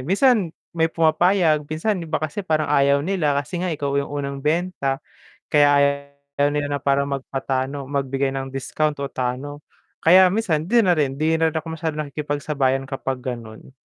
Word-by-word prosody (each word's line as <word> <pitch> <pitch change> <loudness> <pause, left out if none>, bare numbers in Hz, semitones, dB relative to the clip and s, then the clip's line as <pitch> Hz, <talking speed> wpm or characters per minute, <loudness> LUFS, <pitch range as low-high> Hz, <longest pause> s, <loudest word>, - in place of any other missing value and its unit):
Minsan 195 - +3 0.2
may 165 -1 +1
pumapayag, 165 -1 +2
minsan 180 +6 -1
yung 165 - -7
iba 155 - 0
kasi 155 +6 -3
parang 155 -5 0
ayaw 140 0 +3
nila 160 -7 +1
kasi 170 +5 -3
nga 185 - -1
ikaw 145 -4 -2
yung 140 - -5
unang 140 -1 -4
benta 150 -3 0 0.5
kaya 145 -1 +5 0.7
ayaw 145 0 +3
nila 145 0 -1
na - - -3
parang 140 0 +2
magpatalo 135 +1 -3
magbigay 135 -1 -1
ng 135 0 -4
discount 145 +2 -2
o 140 - -2
talo 135 +3 -4 0.4
kaya 185 +3 +7
minsan 180 -6 0
hindi 235 +1 +4
na 180 - +3
rin, 135 -2 0
hindi 155 +3 +1
na 160 - +3
rin 160 - -4
ako 160 0 -4
masyadong 155 -2 -2
nakikipagsabayan 145 -2 -1
kapag 135 -1 -4
ganon. 115 -2 -7
145 Hz, 175 wpm, -22 LUFS, 135-165 Hz, 0.7 s, kaya